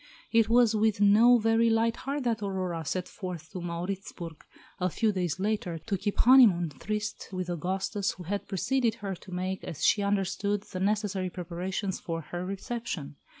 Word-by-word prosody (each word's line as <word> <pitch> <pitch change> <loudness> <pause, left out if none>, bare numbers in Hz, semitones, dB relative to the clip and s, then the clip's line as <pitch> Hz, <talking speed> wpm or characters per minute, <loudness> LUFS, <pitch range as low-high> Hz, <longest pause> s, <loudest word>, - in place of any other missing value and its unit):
It 230 -1 +4
was 235 -1 +5
with 215 -1 +2
no 220 +4 +7
very 225 +1 +3
light 225 +1 +2
heart 280 +2 -3
that 230 -3 0
Aurora 185 -4 -2
set 180 +4 -2
forth 180 -5 -7
to 185 - -6
Mauritzburg, 175 -1 -5 0.4
a 180 0 +1
few 220 +5 +1
days 180 -3 -2
later, 200 -4 -1
to 195 +6 -3
keep 200 +2 -2
"honeymoon 225 -10 +6
tryst" 210 +9 -4
with 185 -2 -3
Augustus, 190 +4 -1
who 180 - -10
had 200 +4 -3
preceded 230 +4 +1
her, 200 -4 -4
to 185 - -14
make, 185 +1 -3
as 160 - -3
she 205 - +4
understood, 200 0 0
the 185 - -7
necessary 200 -1 0
preparations 180 +2 -4
for 165 -1 -4
her 175 +3 -5
reception. 190 -6 -5
195 Hz, 170 wpm, -29 LUFS, 180-215 Hz, 0.4 s, no